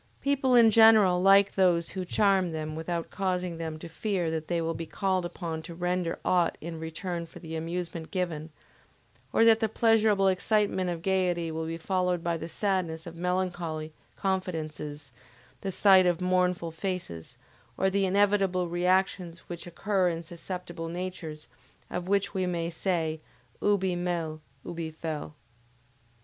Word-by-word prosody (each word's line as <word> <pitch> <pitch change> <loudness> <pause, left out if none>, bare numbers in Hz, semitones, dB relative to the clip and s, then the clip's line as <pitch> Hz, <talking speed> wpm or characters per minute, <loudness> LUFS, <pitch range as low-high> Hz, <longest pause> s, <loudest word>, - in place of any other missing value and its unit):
People 275 -2 +2
in 230 -2 +7
general 215 -5 +6
like 195 +1 +6
those 175 -3 +3
who 185 -1 -4
charm 195 -1 +2
them 155 -1 -4
without 165 +1 -3
causing 180 -3 -2
them 160 -1 -4
to 155 - -8
fear 175 -1 -2
that 160 -1 -3
they 170 -1 0
will 165 0 -1
be 165 0 -6
called 190 -1 0
upon 165 -2 -5
to 170 +1 -9
render 180 -1 -1
aught 175 -2 +2
in 165 0 -6
return 170 +1 -4
for - - -14
the 160 -2 -7
amusement 165 0 -4
given, 170 -4 -3 0.8
or 225 - +4
that 225 -1 +6
the 220 -1 +1
pleasurable 220 -3 +3
excitement 190 -1 +1
of 170 -1 -4
gayety 180 -3 +1
will 160 0 -3
be 165 0 -3
followed 180 0 0
by 170 -1 0
the 165 0 -6
sadness 175 -4 -1
of 170 -1 -8
melancholy 175 -3 -2 0.2
confidences 155 -7 -3 0.5
the 195 - -3
sight 190 -1 +6
of 175 -1 +1
mournful 180 -2 +1
faces, 165 - -5 0.4
or 190 - +2
the 195 0 +2
inevitable 195 -2 +2
reactions 180 0 0
which 175 0 -7
occur 185 +1 +1
in 165 0 -4
susceptible 175 0 -7
natures 170 -3 -6 0.5
of 180 0 -3
which 200 +1 +1
we 185 -2 0
may 170 -1 -2
say: 160 -3 -1 0.4
Ubi 190 -3 +2
mel, 170 -3 -2 0.3
ibi 165 -1 -4
fel. 155 -1 -5
180 Hz, 155 wpm, -28 LUFS, 165-190 Hz, 0.8 s, in